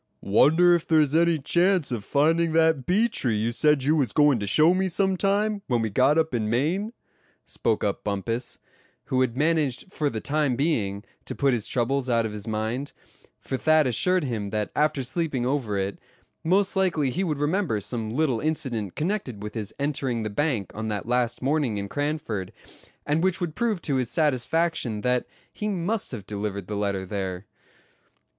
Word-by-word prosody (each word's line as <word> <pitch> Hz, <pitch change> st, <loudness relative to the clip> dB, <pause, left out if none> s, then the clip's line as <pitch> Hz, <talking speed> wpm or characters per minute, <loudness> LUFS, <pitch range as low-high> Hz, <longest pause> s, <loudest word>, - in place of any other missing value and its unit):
"Wonder 160 Hz, -, +5 dB
if 170 Hz, -2 st, 0 dB
there's 155 Hz, -3 st, +3 dB
any 170 Hz, 0 st, +4 dB
chance 175 Hz, +2 st, +2 dB
of 115 Hz, -4 st, -3 dB
finding 160 Hz, +5 st, +2 dB
that 160 Hz, -5 st, +2 dB
bee 210 Hz, +6 st, +3 dB
tree 130 Hz, -, -1 dB
you 110 Hz, +2 st, 0 dB
said 150 Hz, +2 st, +2 dB
you 150 Hz, +4 st, +3 dB
was 130 Hz, -9 st, +1 dB
goin' 145 Hz, -5 st, +4 dB
to 100 Hz, -, -3 dB
show 155 Hz, -, +5 dB
me 190 Hz, +1 st, +1 dB
some 190 Hz, +2 st, +1 dB
time, 205 Hz, +2 st, 0 dB
when 120 Hz, -4 st, +1 dB
we 110 Hz, -, -2 dB
got 130 Hz, +8 st, +3 dB
up 160 Hz, -3 st, +1 dB
in 110 Hz, -3 st, -1 dB
Maine?" 165 Hz, -, 0 dB, 0.5 s
spoke 110 Hz, -2 st, -1 dB
up 100 Hz, -, -1 dB
Bumpus; 115 Hz, +4 st, -3 dB, 0.6 s
who 130 Hz, -, +3 dB
had 125 Hz, -1 st, 0 dB
managed 155 Hz, +2 st, 0 dB
for 150 Hz, -2 st, 0 dB
the 110 Hz, -, -4 dB
time 145 Hz, 0 st, 0 dB
being 110 Hz, -9 st, -1 dB, 0.2 s
to -, -, -5 dB
put 140 Hz, -2 st, +2 dB
his 115 Hz, -4 st, -1 dB
troubles 130 Hz, +1 st, 0 dB
out 115 Hz, -2 st, +2 dB
of 110 Hz, -, -4 dB
his 105 Hz, +1 st, -7 dB
mind; 110 Hz, +6 st, -3 dB, 0.5 s
for 130 Hz, -, -4 dB
Thad 155 Hz, +2 st, +4 dB
assured 180 Hz, -, +2 dB
him 110 Hz, -7 st, -3 dB
that 105 Hz, -1 st, -2 dB
after 150 Hz, -2 st, +1 dB
sleeping 135 Hz, -2 st, -1 dB
over 125 Hz, -6 st, -1 dB
it, 95 Hz, 0 st, -3 dB, 0.4 s
most 190 Hz, +5 st, +2 dB
likely 170 Hz, -8 st, +1 dB
he 185 Hz, +10 st, -1 dB
would 155 Hz, -6 st, -1 dB
remember 150 Hz, -, 0 dB
some 110 Hz, +2 st, -3 dB
little 130 Hz, -1 st, 0 dB
incident 125 Hz, -, -2 dB
connected 150 Hz, -, -3 dB
with 105 Hz, 0 st, -6 dB
his 110 Hz, -3 st, -4 dB
entering 135 Hz, -5 st, -1 dB
the 110 Hz, -, -3 dB
bank 125 Hz, -, -1 dB
on 110 Hz, +1 st, -4 dB
that 105 Hz, -2 st, -3 dB
last 125 Hz, 0 st, 0 dB
morning 140 Hz, -6 st, +1 dB
in 100 Hz, 0 st, -3 dB
Cranford, 145 Hz, -, -3 dB, 0.5 s
and 150 Hz, +3 st, +1 dB
which 190 Hz, 0 st, +1 dB
would 175 Hz, -4 st, -3 dB
prove 215 Hz, -3 st, -1 dB
to 140 Hz, -3 st, 0 dB
his 125 Hz, -3 st, -1 dB
satisfaction 150 Hz, -5 st, 0 dB
that 125 Hz, +1 st, 0 dB, 0.3 s
he 210 Hz, -, -4 dB
must 200 Hz, +2 st, -2 dB
have 110 Hz, -6 st, -7 dB
delivered 100 Hz, -2 st, -4 dB
the 105 Hz, -, -5 dB
letter 100 Hz, -2 st, -1 dB
there. 95 Hz, -1 st, -4 dB
135 Hz, 185 wpm, -25 LUFS, 110-160 Hz, 0.6 s, Wonder